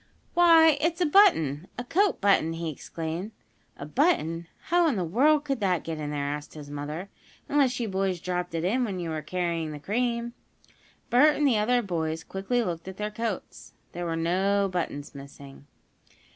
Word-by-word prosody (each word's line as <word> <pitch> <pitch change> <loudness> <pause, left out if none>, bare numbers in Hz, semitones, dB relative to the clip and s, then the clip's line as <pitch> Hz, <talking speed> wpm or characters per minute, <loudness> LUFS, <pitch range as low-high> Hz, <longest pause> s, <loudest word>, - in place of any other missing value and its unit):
"Why, 325 -3 +6
it's 335 +2 0
a 355 - +3
button 185 - +4
a 245 - -3
coat 390 +10 +1
button!" 195 -5 +3
he 165 -1 -3
exclaimed. 165 +7 -6 0.4
"A 140 - -7
button? 165 - +1 0.2
How 345 0 +4
in 290 - +1
the 185 - -1
world 285 - +3
could 275 -3 -1
that 185 -5 0
get 160 -1 -5
in 150 -1 -4
there?" 145 -1 -2
asked 145 +1 -5
his 145 -2 -9
mother. 150 +6 -6 0.4
"Unless 270 -4 +2
you 235 - -1
boys 190 -2 -1
dropped 180 0 -3
it 165 - -2
in 235 +8 +1
when 200 -6 -3
you 170 -2 -4
were 155 -1 -3
carrying 165 -1 -2
the 150 - -7
cream." 235 - -1 0.8
Bert 290 +5 +5
and 295 - +1
the 240 -6 +3
other 245 +3 +2
boys 160 -4 -2
quickly 195 +8 -1
looked 170 -3 -4
at 190 0 -7
their 210 0 -3
coats. 220 -3 -5 0.2
There 175 0 -4
were 165 - -1
no 190 +4 +1
buttons 170 -6 -4
missing. 140 0 -12
190 Hz, 185 wpm, -27 LUFS, 160-245 Hz, 0.8 s, Why